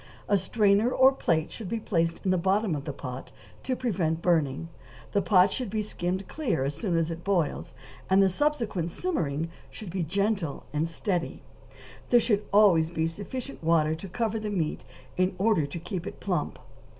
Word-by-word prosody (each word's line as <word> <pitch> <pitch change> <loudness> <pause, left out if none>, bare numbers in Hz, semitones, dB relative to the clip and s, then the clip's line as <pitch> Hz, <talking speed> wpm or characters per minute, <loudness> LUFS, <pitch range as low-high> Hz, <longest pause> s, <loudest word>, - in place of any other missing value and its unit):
A 205 - +3
strainer 205 +3 +3
or 260 +1 +6
plate 165 - 0
should 215 -6 -6
be 230 - -1
placed 165 -5 -1
in 185 - +3
the 185 - +3
bottom 195 +1 +1
of 145 - -5
the 150 - -3
pot 130 -2 -7 0.3
to 260 - -1
prevent 180 -11 -1
burning; 165 -3 +1 0.4
the 200 - +2
pot 190 -1 +4
should 250 -5 -3
be 215 +1 -1
skimmed 185 -1 -3
clear 265 - -1
as 140 +2 -1
soon 170 +2 -1
as 165 0 0
it 165 +1 -6
boils, 180 -6 -1 0.3
and 190 +1 +5
the 195 - +6
subsequent 220 - 0
simmering 165 - -2 0.2
should 205 -5 -9
be 185 +1 -2
gentle 195 -1 -1
and 155 +2 0
steady; 175 0 -2 0.7
there 240 - +6
should 215 -3 +1
always 190 -6 +5
be 160 -1 -1
sufficient 220 +9 -6
water 160 -1 +3
to 165 +4 -7
cover 225 +2 -1
the 215 0 -3
meat 170 -7 -2 0.3
in 185 +1 +1
order 195 -7 +2
to 145 - -6
keep 175 +1 -5
it - - -8
plump. 180 -6 -2
185 Hz, 185 wpm, -27 LUFS, 165-210 Hz, 0.7 s, or